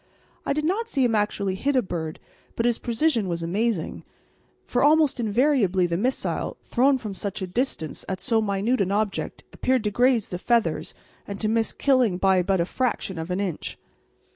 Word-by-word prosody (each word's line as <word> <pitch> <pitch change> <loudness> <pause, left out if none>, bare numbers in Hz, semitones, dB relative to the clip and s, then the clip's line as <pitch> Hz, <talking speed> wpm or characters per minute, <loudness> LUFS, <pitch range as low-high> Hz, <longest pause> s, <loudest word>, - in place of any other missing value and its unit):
I - - +2
did 305 +1 -1
not 435 +7 0
see 270 - +2
him 235 - +1
actually 205 -2 0
hit 275 +9 -1
a 255 - +3
bird, 160 -4 -4 0.4
but 230 - 0
his 240 -1 +2
precision 235 -3 +1
was 170 -1 -3
amazing, 200 +1 -1 0.6
for 245 - 0
almost 300 -2 +4
invariably 220 - +2
the 170 -1 -1
missile, 245 +9 -1
thrown 265 +2 +3
from 215 -5 -6
such 200 +1 -4
a - - 0
distance 185 - -3
at 190 -1 -2
so 225 -1 +1
minute 205 +4 0
an 195 0 0
object, 210 0 -2
appeared 255 -3 +1
to 210 - 0
graze 245 0 +2
the 180 - -4
feathers 235 +2 0 0.3
and 200 -1 -6
to 215 - 0
miss 225 +1 +1
killing 255 -9 +2
by 190 -1 +3
but 190 +1 +1
a 170 - +2
fraction 200 -4 -2
of 160 +2 -5
an 180 +1 -1
inch. 190 -6 -3
215 Hz, 190 wpm, -25 LUFS, 190-255 Hz, 0.6 s, almost